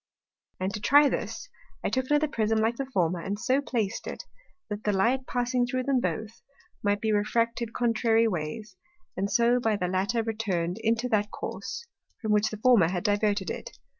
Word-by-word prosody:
And 190 +1 -2
to 210 - -3
try 290 +6 +6
this, - - -4 0.4
I - - +1
took 260 0 -1
another 295 +1 +3
Prism 225 -5 0
like 225 +2 +1
the 275 - -3
former, 180 -8 0
and 195 +4 -3
so 255 +5 +1
plac'd 225 -7 -2
it, - - -6 0.4
that 210 0 -5
the 210 - +2
Light 240 +7 +1
passing 245 0 0
through 255 +1 -1
them 270 -1 +2
both, 220 -1 -3 0.4
might 205 0 +1
be 220 - +1
refracted 230 +2 0
contrary 230 -1 +2
ways, 185 +3 -4 0.4
and 195 +1 -1
so 235 +1 +4
by 225 -3 +1
the 180 -3 -1
latter 195 +6 0
return'd 200 -5 -2
into 230 +2 +1
that 210 -2 +1
Course, 470 - -6 0.3
from 220 - -2
which 210 +1 +3
the 215 - -6
former 220 -6 +5
had 175 0 -2
diverted 205 -3 +1
it. - - -7
220 Hz, 185 wpm, -27 LUFS, 205-245 Hz, 0.4 s, try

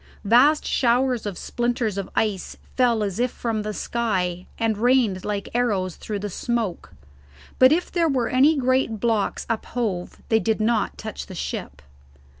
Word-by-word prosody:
Vast 260 +8 +5
showers 245 -2 +1
of 200 - -5
splinters 240 -3 -1
of 195 -1 -4
ice 205 -4 -1 0.2
fell 240 -4 +3
as 200 0 -3
if 250 +1 +2
from 225 -3 -3
the 210 0 -3
sky, 185 -6 -2
and 225 -2 0
rained 235 -6 +2
like 205 -1 -3
arrows 205 -7 0
through 210 - -5
the 205 +1 -4
smoke, 225 -2 -3 0.7
but 255 +1 +7
if 345 +3 +1
there 335 -3 +2
were 255 -4 +1
any 285 +5 +4
great 255 -4 +1
blocks 225 -3 0
uphove 220 -5 -3
they 220 -2 +4
did 220 0 0
not 220 0 0
touch 220 -1 -6
the 185 - -9
ship. 75 - -5
225 Hz, 160 wpm, -23 LUFS, 205-245 Hz, 0.7 s, but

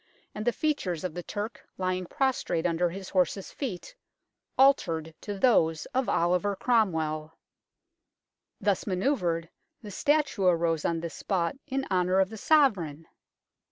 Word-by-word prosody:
and 210 - -5
the - - +5
features 220 - -1
of 180 -4 -3
the 175 - -5
Turk 205 +5 -5
lying 185 -1 -1
prostrate 265 - 0
under 175 0 +1
his 190 +2 -7
horse's 190 +1 0
feet 245 - -5 0.6
altered 165 - +3
to 205 -1 -5
those 165 -9 +3
of 260 0 0
Oliver 180 +4 +1
Cromwell. 160 -9 0 1.2
Thus 200 0 0
manoeuvred, 180 - 0 0.4
the 210 - -8
statue 290 -5 +1
arose 165 -3 +2
on 165 -1 0
this 170 -1 -5
spot 180 -1 -1
in 270 -1 -2
honour 185 0 +2
of 190 +1 +2
the 220 - -7
Sovereign 200 - +2
185 Hz, 135 wpm, -28 LUFS, 170-225 Hz, 1.2 s, the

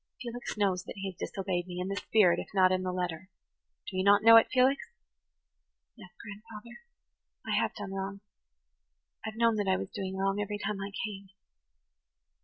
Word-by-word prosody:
Felix 245 -2 -6
knows 190 -3 +1
that - - -8
he 195 -1 -4
has - - -21
disobeyed 185 -2 -3
me, 180 0 -6
in 180 - -2
the 195 - -2
spirit 185 -3 +3
if - - -6
not 185 -1 +5
in 185 0 +1
the 185 0 -2
letter. 180 0 -4 0.6
Do - - -7
you 185 - +1
not 200 +1 +5
know 230 0 +9
it, 225 - +8
Felix?" 260 +2 +3 1.1
"Yes, 215 -6 -13
grandfather, 215 - -11 0.6
I - - -4
have - - -2
done 200 -2 -6
wrong–I've 190 - -10
known 230 -1 +3
that 205 -1 -1
I 190 0 +3
was - - -6
doing 190 -1 -4
wrong 195 +1 0
every 205 0 -3
time 205 -1 -3
I 200 +1 -5
came. 200 -2 -8
195 Hz, 180 wpm, -30 LUFS, 185-210 Hz, 1.1 s, know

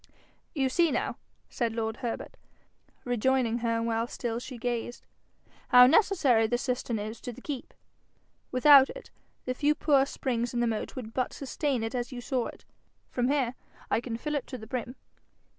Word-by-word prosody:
'You 270 -3 +2
see 335 +6 +3
now,' - - -1 0.3
said 235 -2 -2
lord 220 0 -2
Herbert, 240 -3 -5 0.7
rejoining 245 0 +1
her 230 -1 0
while 230 0 0
still 235 -1 -3
she 250 0 -8
gazed, 240 0 -3 0.6
'how 250 0 +9
necessary 275 - +4
the 240 +2 +1
cistern 250 -2 -2
is 215 +2 -6
to 245 - -5
the 240 - -12
keep? 275 -1 -6 0.8
Without 270 +1 +7
it, - - -10 0.3
the 255 - -1
few 295 +3 +2
poor 275 -3 +3
springs 240 -3 -2
in - - +1
the 240 - +2
moat 225 -2 -3
would 225 -4 -7
but 255 - -1
sustain 275 -3 -2
it 225 - -3
as 245 0 -3
you 250 - -6
saw 250 0 -1
it. - - -12 0.5
From 245 -1 0
here 265 -3 +1 0.4
I - - +2
can 235 -2 -4
fill 300 +5 -4
it 290 - -2
to 255 - -6
the 220 - -10
brim.' 245 +1 -4
245 Hz, 175 wpm, -29 LUFS, 230-265 Hz, 0.8 s, how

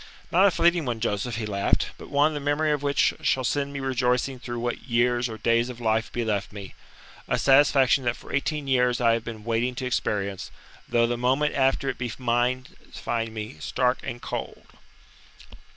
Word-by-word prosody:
"Not 185 +3 +5
a - - +6
fleeting 170 -2 +2
one, 120 -3 -2
Joseph," 110 +1 -2
he 110 0 -3
laughed. 100 -2 0
"But - - -10
one 145 +2 +3
the 145 - -3
memory 145 +2 +1
of 145 -2 0
which 140 0 +2
shall 130 - +1
send 140 +2 -1
me 140 - -5
rejoicing 130 0 0
through 120 -1 -6
what 120 +2 -4
years 120 +1 +2
or 110 - -6
days 115 +2 +1
of 125 -1 -8
life 110 -1 0
be 120 -1 -2
left 105 -2 -1
me. 100 -2 -9 0.5
A - - +1
satisfaction 135 -1 +4
that 120 0 +1
for - - -12
eighteen 145 0 -1
years 125 -2 +2
I 115 -2 +4
have 115 -1 -1
been 115 -2 -7
waiting 115 +2 -1
to 130 - -4
experience; 100 -6 -2 0.4
though 115 0 +3
the 120 0 -1
moment 130 +5 +1
after 135 0 +1
it 130 - -3
be 120 -2 -3
mine 125 +1 0 0.3
find 115 -1 -3
me 110 -5 -7
stark 125 +8 0
and 120 - -6
cold." - - -6
125 Hz, 195 wpm, -25 LUFS, 115-135 Hz, 0.5 s, a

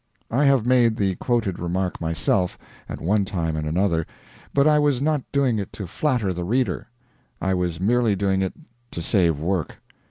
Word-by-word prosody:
I 135 +6 +2
have 135 -5 +4
made 120 -3 +4
the 100 -3 +1
quoted 115 -7 -1
remark 90 +1 -2
myself, 85 +3 0 0.3
at - - -5
one 100 +4 +1
time 85 -5 -2
and 75 -1 -3
another, 85 0 +1 0.4
but 140 +1 +3
I 150 -1 +5
was 145 -4 +2
not 150 +1 +1
doing 135 -6 +2
it 100 - -5
to 100 - -6
flatter 115 - 0
the 90 0 -4
reader; 125 +8 -1 0.5
I 95 - 0
was 90 -2 -1
merely 115 +2 +2
doing 95 -1 +1
it 95 - -1 0.4
to 85 - -4
save 85 -7 +2
work. 85 +1 -1
100 Hz, 180 wpm, -23 LUFS, 90-125 Hz, 0.5 s, I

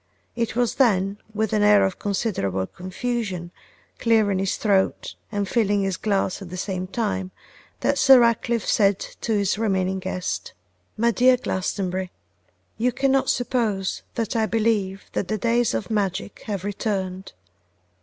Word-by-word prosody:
It 230 -1 -2
was 245 -1 +1
then, 200 -4 +2
with 220 0 -1
an 210 - +2
air 205 -1 +6
of 190 - -3
considerable 180 - -1
confusion, 185 - -4 0.5
clearing 215 -5 +3
his 195 0 -1
throat, 195 -3 +1 0.2
and 205 -2 -1
filling 205 -2 +1
his 195 -1 0
glass 195 0 -1
at 190 - -8
the 185 - -6
same 185 -1 -3
time, 195 -3 -2 0.5
that - - +1
Sir 265 -2 +8
Ratcliffe 235 0 +1
said 200 -2 +3
to 225 - -4
his 200 -1 +1
remaining 190 -3 0
guest, 185 -1 -4 0.4
'My 235 +2 +3
dear 250 +2 +5
Glastonbury, 185 -3 -2 0.7
you 250 +3 +2
cannot 270 +1 +1
suppose 225 -6 0
that 230 -2 -2
I 220 -1 +2
believe 210 -4 0
that 185 - -1
the 215 - -1
days 235 - +1
of 115 - -3
magic 200 -2 -2
have 200 -4 -3
returned. 195 -2 -3
205 Hz, 145 wpm, -23 LUFS, 190-230 Hz, 0.7 s, Sir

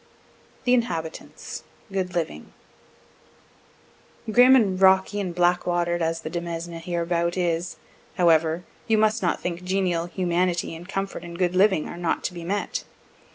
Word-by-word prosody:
THE 250 - +3
INHABITANTS 165 -10 -3 0.3
GOOD 190 -1 -2
LIVING 115 - -3 1.8
Grim 250 +3 +7
and 195 -7 +2
rocky 190 +2 +4
and 180 -4 -3
black 175 0 +2
water'd 175 0 0
as 165 0 -1
the 155 - -5
demesne 170 -1 -4
hereabout 170 +1 -1
is, 175 -1 -1 0.4
however, 165 -1 +3 0.2
you 220 - +3
must 215 +1 +2
not 175 -3 0
think 175 0 -4
genial 180 -2 0
humanity, 175 -1 0
and 175 +3 -11
comfort, 195 -3 -3
and 170 0 -8
good 180 -1 +1
living 190 -4 +3
are - - -8
not 175 -1 -1
to - - -2
be 170 -1 -7
met. 200 +4 -2
175 Hz, 145 wpm, -25 LUFS, 170-190 Hz, 1.8 s, Grim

